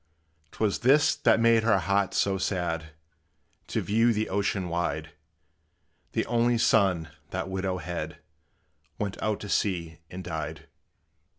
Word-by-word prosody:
'T - - -15
was 105 -3 +1
this 140 +4 +5
that - - +3
made 115 -1 +5
her 110 -2 +3
heart 100 +1 0
so 95 -1 +1
sad, 85 -4 -2 0.7
To - - -1
view 115 +3 +3
the 110 0 -1
ocean 100 -1 0
wide: 85 -2 -2 1.0
The - - 0
only 120 0 +2
son, 95 -8 +3 0.2
that 95 +1 -3
widow 95 -1 -1
had, 90 -1 -5 0.8
Went 100 -2 -4
out 110 -1 0
to 105 - -7
sea 85 -6 -1
and 95 +1 -7
died. 80 -4 -5
95 Hz, 135 wpm, -27 LUFS, 85-110 Hz, 1.0 s, this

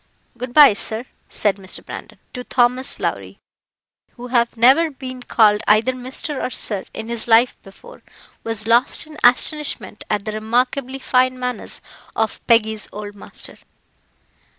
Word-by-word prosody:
Good 245 +1 -6
bye, 295 -7 +9
sir," 220 +3 -1 0.2
said 205 -2 0
Mr. 190 -1 -5
Brandon, - - -9 0.2
to 250 - -6
Thomas 250 +1 +1
Lowrie, - - -4 0.8
who 245 0 -10
having 235 -1 +1
never 270 +8 +5
been 260 -3 -9
called 210 -3 +3
either 215 +4 +4
Mr. 260 +3 -4
or - - -1
Sir 205 -5 -2
in 220 - -7
his 235 -1 -4
life 235 +2 +4
before, 475 - -15 0.4
was 225 -2 -1
lost 235 +6 +2
in 310 0 -13
astonishment 245 -4 +2
at 205 -2 -1
the 215 - -3
remarkably 245 +5 -1
fine 255 -1 +1
manners 250 -2 -4 0.3
of 220 -1 -1
Peggy's 220 -2 +2
old 205 0 -7
master. 205 - -8
240 Hz, 145 wpm, -20 LUFS, 220-255 Hz, 0.8 s, bye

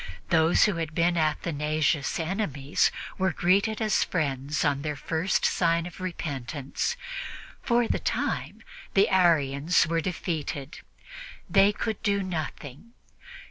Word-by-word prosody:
Those 160 -1 +4
who 205 -5 +2
had 160 -2 -4
been 170 +1 +2
Athanasius' 155 -2 0
enemies 160 -6 0 0.3
were 190 0 +2
greeted 200 +6 +2
as 215 -2 +2
friends 145 -2 -1
on 140 -1 +1
their 150 0 -3
first 160 +6 0
sign 170 -1 +2
of 180 +1 -9
repentance. 145 - -3 0.6
For 240 -2 +2
the - - 0
time, - - -2 0.3
the 195 0 +5
Arians 165 -4 +3
were 165 +1 0
defeated; 155 -5 -4 0.7
they 200 0 +5
could 220 0 -3
do 200 -2 +1
nothing. 160 - -6
165 Hz, 120 wpm, -27 LUFS, 150-190 Hz, 0.7 s, the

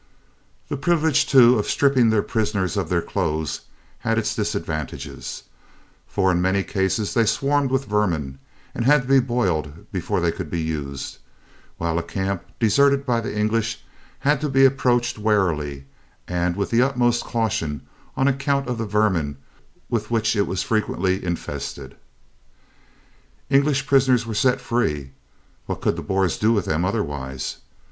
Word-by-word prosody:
The 145 - -3
privilege 160 -1 +2
too 125 -3 +6
of 105 - -2
stripping 135 -5 +3
their 110 -2 +2
prisoners 105 -5 -1
of - - -1
their - - +1
clothes 80 0 -2 0.4
had - - 0
its - - 0
disadvantages, 75 -3 -4 0.6
for 95 -2 +1
in 90 -1 +1
many 95 +2 +1
cases 95 +2 -1
they 115 - +3
swarmed 140 +3 +1
with 135 +1 0
vermin 85 - -1 0.3
and - - -2
had 145 +2 +4
to - - -10
be 135 0 +6
boiled 90 - -2
before - - -1
they 85 -1 +1
could 85 -2 -6
be 85 - -2
used, 75 -4 -4 0.6
while 85 0 -1
a - - -1
camp 95 +2 -3 0.2
deserted 140 +5 +3
by 120 -2 +1
the 105 - -5
English 110 +1 0 0.4
had 145 +1 +2
to 150 - -1
be 135 0 +5
approached 120 -3 +2
warily 80 -10 0 0.4
and 90 0 0
with 100 0 -2
the 115 +1 +4
utmost 125 -2 +2
caution 85 - -2 0.3
on 135 - +3
account 140 0 0
of 125 -2 -3
the 115 - -2
vermin 95 -9 +1 0.5
with 110 -2 -2
which 115 -1 +1
it 100 -3 0
frequently 95 -2 0
was - - -13
infested. 85 -5 -5 1.6
English 140 0 +3
prisoners 130 -4 +3
were 115 - -4
set 125 +4 +2
free 75 - -1 0.6
(what - - -3
could - - 0
the - - -5
Boers 95 -3 0
do 110 +2 +3
with 105 -5 +1
them 80 +3 0
otherwise?) 70 - -3
105 Hz, 155 wpm, -22 LUFS, 85-125 Hz, 1.6 s, too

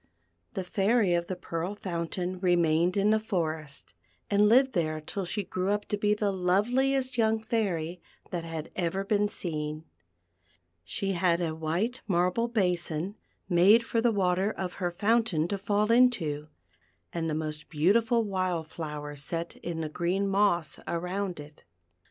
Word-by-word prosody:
The 190 - -2
Fairy 200 +1 +2
of 170 0 0
the 185 - -3
Pearl 175 +2 -4
Fountain 180 -1 -3
remained 175 0 +2
in 200 +2 +3
the 220 - +4
forest, 160 -9 -3 0.4
and 205 +1 +5
lived 260 +3 +5
there 155 -4 0
till 185 +5 -5
she 205 +4 -2
grew 185 +1 -2
up 205 0 0
to - - +1
be 210 0 +2
the 210 -1 0
loveliest 245 +8 +1
young 220 0 +3
Fairy 180 -7 -2 0.3
that 175 -2 -2
had 165 -2 -6
ever 185 +2 -1
been 205 0 +2
seen. 155 -4 -3 1.0
She 195 - -2
had 175 -2 +2
a 165 -3 -1
white 170 +10 -2
marble 180 +5 +2
basin, 180 -5 -1 0.3
made 195 +6 +6
for 230 0 0
the 235 0 +3
water 190 -1 +1
of 185 -4 -4
her 175 - +1
fountain 205 -3 +1
to 200 - -1
fall 210 +2 +1
into, 190 -12 +3 0.7
and 165 -1 -1
the 155 - -1
most 155 -1 -4
beautiful 225 +9 +3
wild 185 -5 -1
flowers 150 -3 -6
set 165 +3 -4
in 170 -1 -4
the 155 - -2
green 180 +5 -1
moss 195 -6 +1
around 180 +1 -2
it. 150 +1 -12
180 Hz, 155 wpm, -28 LUFS, 165-210 Hz, 1.0 s, made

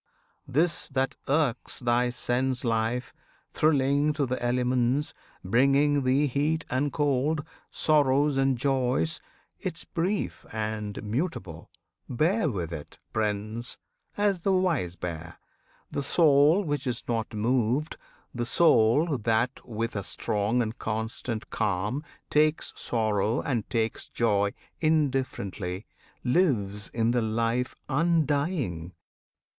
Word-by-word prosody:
This 160 +6 +1
that 135 -1 -1
irks 140 -4 +1
Thy 120 0 +2
sense 125 +1 0
life, 115 +2 0 0.4
thrilling 145 0 +3
to 145 -1 0
the 130 -1 -3
elements 125 +3 +1 0.3
Bringing 140 +7 +3
thee 135 +3 +3
heat 150 +4 0
and 140 +3 +1
cold, 145 +1 +1 0.3
sorrows 145 -1 +3
and 135 -1 +2
joys, 125 - +1 0.4
'Tis - - -3
brief 185 +5 -2
and 110 -1 -3
mutable! 105 - -3 0.4
Bear 160 - +2
with 90 - -3
it, 75 -3 -8 0.2
Prince! 110 +2 -2 0.4
As 205 -3 +1
the 195 +3 +2
wise 170 - +1
bear. 80 -2 -6 0.6
The - - -2
soul 150 +4 +4
which 145 -4 -2
is 125 -1 -2
not 115 -2 -1
moved, 125 +6 +1 0.4
The 120 -1 -2
soul 145 0 +4
that 115 +3 0
with 115 0 -4
a 100 - -1
strong 105 +6 0
and 110 0 -4
constant 110 +1 -4
calm 105 +8 -1 0.3
Takes 155 +1 +2
sorrow 110 -1 0
and 120 -7 -2
takes 115 -1 -1
joy 100 -3 +1 0.3
indifferently, 130 - -1 0.4
Lives 115 - +1
in 115 0 +1
the 120 0 +2
life 115 +3 0
undying! 145 - 0
125 Hz, 115 wpm, -27 LUFS, 110-145 Hz, 0.6 s, soul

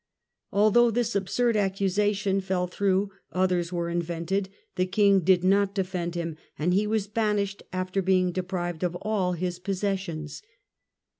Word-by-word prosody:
Although 215 +4 +5
this 230 0 -1
absurd 230 +4 +1
accusation 195 0 +1
fell 185 -1 -1
through, 195 +2 0 0.2
others 180 -2 +1
were 170 -1 -2
invented, 170 +3 -2 0.3
the 185 0 +1
King 200 0 +4
did 180 0 +3
not 200 +1 +3
defend 180 -3 -2
him, 165 -2 -3 0.2
and 175 +4 +1
he 205 +3 +2
was 215 -2 0
banished 210 -2 -1
after 185 +1 -1
being 185 -1 +2
deprived 175 -2 -3
of 175 -1 -1
all 200 -4 0
his 175 0 -3
possessions. 190 -5 -3
190 Hz, 140 wpm, -26 LUFS, 180-200 Hz, 0.3 s, Although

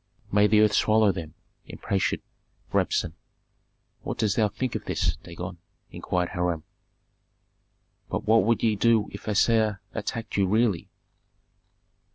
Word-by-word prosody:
"May 105 +1 +5
the 105 +1 +4
earth 105 -1 +4
swallow 110 -1 +4
them!" 85 -4 -7 0.3
imprecated 95 -1 -2 0.5
Rabsun. - - +1 0.9
"What - - -5
dost 105 -2 +1
thou 110 -2 +3
think 115 +5 -3
of - - -4
this - - 0
Dagon?" 90 +1 -8 0.3
inquired 90 -1 -2
Hiram. 85 -3 -2 1.5
"But - - -3
what 110 -1 +5
would 115 +2 +1
ye 110 -2 +3
do 110 0 +3
if 100 +2 -10
Assar 110 -1 +2
attacked 110 0 -4
you 100 -1 +3
really?" 105 -3 +1
105 Hz, 130 wpm, -26 LUFS, 95-110 Hz, 1.5 s, May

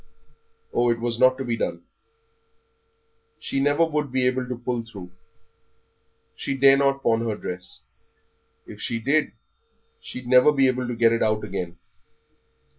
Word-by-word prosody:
Oh, 120 0 +2
it 115 0 +1
was 120 0 -2
not 130 0 +5
to 135 - -4
be 120 -1 -1
done 85 -5 -3 1.6
she 135 - -3
never 145 +4 +3
would 150 -4 -2
be 130 -1 +1
able 125 0 -1
to 125 - -3
pull 120 -1 -3
through. 100 -6 -10 1.3
She 135 - -4
dare 135 0 +6
not 140 0 +1
pawn 115 0 +2
her 110 - -1
dress; 90 -3 -6 0.8
if - - -11
she 115 - -2
did 140 +7 0 0.7
she'd 125 - -9
never 125 +3 +6
be 135 -2 +3
able 130 -1 -1
to 120 - -3
get 115 0 +4
it 115 - -1
out 110 -1 +1
again. 90 -4 -5
125 Hz, 155 wpm, -24 LUFS, 115-135 Hz, 1.6 s, dare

